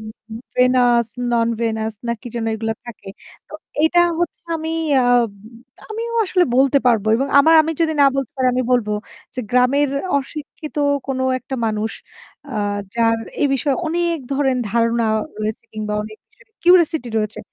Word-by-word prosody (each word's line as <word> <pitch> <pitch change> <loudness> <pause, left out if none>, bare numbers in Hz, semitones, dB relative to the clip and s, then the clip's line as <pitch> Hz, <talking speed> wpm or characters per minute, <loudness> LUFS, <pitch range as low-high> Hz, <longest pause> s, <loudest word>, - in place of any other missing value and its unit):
উ - - -10 0.3
উ - - -5 0.2
venous, 245 -2 +4 0.3
non-venous 230 -1 0
না 235 - 0
কি - - -12
যেন 235 -1 -2
এগুলো 225 0 -2
থাকে। 230 -4 -10 0.4
তো - - -17 0.3
এটা 345 +2 +4 0.2
হচ্ছে 345 - -3
আমি 320 0 -4 0.3
আহ 245 -1 +4 0.7
আমিও 460 +2 -4
আসলে 365 -2 +2
বলতে 275 +1 +4
পারবো 225 -4 +3
এবং 270 +4 0
আমার 320 +4 +6
আমি 325 +1 -2
যদি 320 -1 +2
না 280 - +7
বলতে 275 -1 -2
পারি 260 -1 +1
আমি 255 - +1
বলব 240 -4 +2 0.5
যে 255 - -3
গ্রামের 250 +4 +3 0.3
অশিক্ষিত 300 +2 -8 0.3
কোন 270 -1 -2 0.2
একটা 265 +1 -7
মানুষ 220 0 -1 0.6
আহ 205 -2 -1 0.2
যার 230 -1 +2 0.2
এই - - +5
বিষয়ে 275 +1 0
অনেক 340 +1 0
ধরেন 270 -2 +1
ধারণা 230 0 +1 0.4
রয়েছে 215 0 -3
কিংবা 215 -1 -4
অনেক 215 0 -9
বিষয়ে 445 0 -26
কিউরিসিটি 340 -7 +4
রয়েছে। 215 0 -3
250 Hz, 155 wpm, -20 LUFS, 230-300 Hz, 0.7 s, না